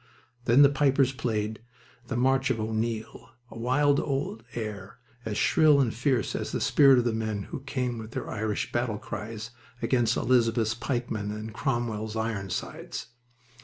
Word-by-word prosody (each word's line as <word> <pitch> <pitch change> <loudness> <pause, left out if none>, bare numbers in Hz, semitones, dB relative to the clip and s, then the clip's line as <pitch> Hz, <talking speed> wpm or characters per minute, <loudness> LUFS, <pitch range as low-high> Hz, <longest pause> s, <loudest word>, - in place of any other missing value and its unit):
Then 125 +5 +7
the 140 - +8
pipers 135 -2 +3
played 110 -4 -2 0.5
the - - -2
"March 130 +1 +2
of 125 -3 0
O'Neill," 110 +1 -3 0.2
a 115 - -9
wild 140 +4 +3
old 135 -5 -2
air 105 -4 -5 0.3
as 105 -2 -2
shrill 155 -3 +5
and 125 -5 +2
fierce 125 -1 0
as - - -3
the - - -1
spirit 135 -3 +6
of 125 - +3
the 120 - +1
men 110 -2 -2
who - - -6
came 125 -3 -3
with 110 -1 -7
their - - -5
Irish 110 -1 -2
battle 120 -3 -1
cries 110 +2 -6 0.3
against 120 -1 +2
Elizabeth's 115 -3 +2
pikemen 120 -3 -3
and 110 +1 -5
Cromwell's 120 -5 -2
Ironsides. 110 -1 -4
115 Hz, 155 wpm, -27 LUFS, 110-130 Hz, 0.5 s, the